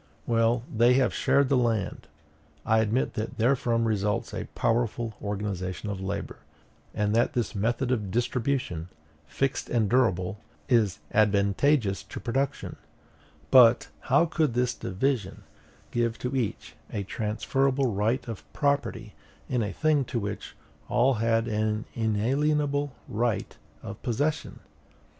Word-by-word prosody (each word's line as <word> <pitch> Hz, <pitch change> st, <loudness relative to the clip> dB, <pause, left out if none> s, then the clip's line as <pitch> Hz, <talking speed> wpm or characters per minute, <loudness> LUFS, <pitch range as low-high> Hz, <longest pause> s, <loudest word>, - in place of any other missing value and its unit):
Well, 115 Hz, 0 st, +2 dB
they 120 Hz, +3 st, +5 dB
have 130 Hz, -1 st, +2 dB
shared 140 Hz, +1 st, +3 dB
the 140 Hz, -, +2 dB
land. 115 Hz, -5 st, 0 dB, 0.6 s
I 110 Hz, 0 st, +3 dB
admit 110 Hz, +4 st, +1 dB
that 110 Hz, +1 st, -4 dB
therefrom 115 Hz, -1 st, +2 dB
results 105 Hz, -2 st, -1 dB
a -, -, -3 dB
more -, -, -4 dB
powerful 115 Hz, -1 st, 0 dB
organization 100 Hz, -1 st, -3 dB
of 95 Hz, -2 st, -5 dB
labor; 95 Hz, +1 st, -4 dB, 0.6 s
and 105 Hz, 0 st, +1 dB
that 120 Hz, +2 st, +2 dB
this 120 Hz, -1 st, -1 dB
method 120 Hz, +5 st, 0 dB
of 105 Hz, -6 st, -1 dB
distribution, 120 Hz, -6 st, -1 dB, 0.4 s
fixed 135 Hz, -, -1 dB
and 115 Hz, -3 st, +2 dB
durable, 100 Hz, -5 st, +1 dB, 0.3 s
is 110 Hz, -, +3 dB, 0.2 s
advantageous 105 Hz, +2 st, +2 dB
to -, -, -8 dB
production: 135 Hz, +3 st, -2 dB, 0.7 s
but 120 Hz, -2 st, +7 dB, 0.2 s
how 140 Hz, +6 st, +5 dB
could 155 Hz, -6 st, 0 dB
this 125 Hz, 0 st, +1 dB
division 100 Hz, -1 st, -2 dB, 0.5 s
give 115 Hz, -1 st, 0 dB
to 125 Hz, +2 st, -3 dB
each 120 Hz, -6 st, -3 dB, 0.2 s
a 100 Hz, -, -2 dB
transferable 130 Hz, +5 st, 0 dB
right 110 Hz, +7 st, 0 dB
of 115 Hz, -4 st, -6 dB
property 140 Hz, -1 st, -1 dB, 0.3 s
in 125 Hz, -2 st, 0 dB
a 105 Hz, -2 st, -2 dB
thing 155 Hz, +4 st, +2 dB
to 120 Hz, -, -2 dB
which 100 Hz, -1 st, -5 dB, 0.3 s
all 130 Hz, +4 st, +3 dB
had 115 Hz, 0 st, +1 dB
an 110 Hz, 0 st, -1 dB
inalienable 140 Hz, +6 st, +1 dB, 0.2 s
right 115 Hz, 0 st, -1 dB, 0.3 s
of -, -, -8 dB
possession? 145 Hz, +6 st, -2 dB
115 Hz, 130 wpm, -27 LUFS, 105-130 Hz, 0.7 s, but